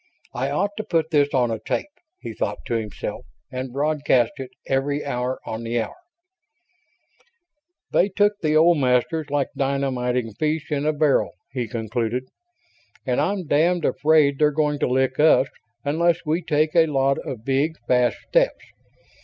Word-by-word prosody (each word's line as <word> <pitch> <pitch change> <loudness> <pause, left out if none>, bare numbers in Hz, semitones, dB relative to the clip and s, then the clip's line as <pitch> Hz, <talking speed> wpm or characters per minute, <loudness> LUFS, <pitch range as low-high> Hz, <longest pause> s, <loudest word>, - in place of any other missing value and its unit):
I 130 +3 -2
ought 195 +8 0
to 215 - -2
put 160 -4 0
this 145 -2 +3
on 125 -3 +1
a 110 - -3
tape, 110 - -2 0.4
he - - -6
thought - - -2
to - - -3
himself, 110 -3 -4 0.3
and 130 0 -5
broadcast 140 -3 +1
it 135 -2 -6 0.2
every 140 +2 -1
hour 125 -1 -2
on 110 - -5
the 115 +1 -1
hour. 115 - -3 2.0
"They 195 - +3
took 205 +2 +2
the 155 -2 +1
old 165 +1 +5
Masters 135 +4 +1
like 140 -2 0
dynamiting 130 -4 -1
fish 155 +6 -2
in 145 0 0
a - - +4
barrel," 150 -2 +2 0.2
he 125 -3 -3
concluded, 115 +2 -2 0.8
"and 130 +1 +1
I'm 190 +3 -1
damned 165 +3 +2
afraid 150 -2 +3
they're 150 -1 +5
going 150 -1 0
to - - +1
lick 130 +1 0
us 150 -4 +5 0.4
unless 170 +4 +1
we 160 +3 0
take 155 -1 0
a 165 -1 +5
lot 135 -2 +1
of 120 -4 -7
big, 140 +4 +1
fast 125 -1 +2
steps. - - +1
140 Hz, 160 wpm, -23 LUFS, 125-155 Hz, 2.0 s, old